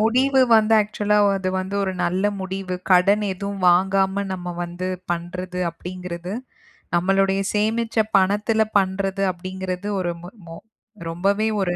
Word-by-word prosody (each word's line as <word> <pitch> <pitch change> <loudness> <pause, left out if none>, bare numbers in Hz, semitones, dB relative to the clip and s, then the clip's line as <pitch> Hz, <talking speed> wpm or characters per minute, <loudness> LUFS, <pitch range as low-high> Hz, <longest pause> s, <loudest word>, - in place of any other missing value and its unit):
முடிவு 260 +5 +3 0.2
வந்து 220 0 +4
ஆக்ச்சுவலா 210 0 0
ஆ - - +3
அது 190 -1 -2
வந்து 190 +2 -5
ஒரு 190 -1 -1
நல்ல 185 +3 0 0.2
முடிவு. 190 -1 -4 0.2
கடன் 195 +3 +5
எதுவும் 200 0 -4
வாங்காம, 195 +2 +2
நம்ம 180 -1 -5
வந்து 175 +2 -5 0.2
பண்றது 180 +1 -5
அப்படிங்கிறது. 180 +1 -7 0.6
நம்மளுடைய 195 +2 +2
சேமிச்ச 225 +2 0 0.2
பணத்துல 210 +3 +2 0.2
பண்றது 195 0 0
அப்படிங்கிறது 185 +1 -5
ஒரு 175 -2 -1
மொ 175 - -8 0.2
மொ 165 - -9 0.5
ரொம்பவே 200 +6 +1
ஒரு 175 -2 0
190 Hz, 135 wpm, -22 LUFS, 180-200 Hz, 0.6 s, கடன்